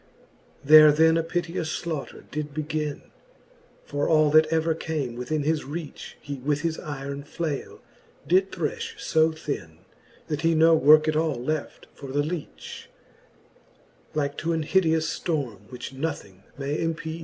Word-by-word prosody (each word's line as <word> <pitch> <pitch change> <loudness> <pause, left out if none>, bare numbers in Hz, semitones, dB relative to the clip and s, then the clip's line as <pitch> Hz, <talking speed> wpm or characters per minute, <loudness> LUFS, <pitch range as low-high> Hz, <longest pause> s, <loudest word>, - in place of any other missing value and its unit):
There 155 +1 +9
then 160 +2 +4
a 165 - +3
piteous 165 -1 -2
flaughter 160 -4 -5
did 150 -1 -4
begin: 155 -1 -3 0.8
For 145 0 -1
all 155 -2 +4
that 155 +1 +6
ever 160 +1 +1
came 155 -6 -3
within 145 +5 -2
his 155 +1 0
reach, 150 +1 -7
He 145 -1 -6
with 145 +2 -1
his 165 -1 -2
yron 140 -1 -6
flale 150 -1 -5 0.4
did 190 +2 +3
threfh 160 -5 -3
fb 160 0 +2
thin, 80 - -5 0.5
That 150 -2 -3
he 165 0 +3
no 165 +1 +6
worke 155 +1 +6
at 155 - +1
all 155 -2 +1
left 155 +4 -3
for 140 -2 -9
the 145 +2 +1
leach: 160 0 -7 1.3
Like 145 -1 -1
to 170 +1 -1
an 160 -1 -1
hideous 160 -1 +1
ftorme, 125 - -3
which 125 +1 -8
nothing 130 - -5
may 140 +2 -2
empeach. 165 0 -3
155 Hz, 150 wpm, -25 LUFS, 145-160 Hz, 1.3 s, There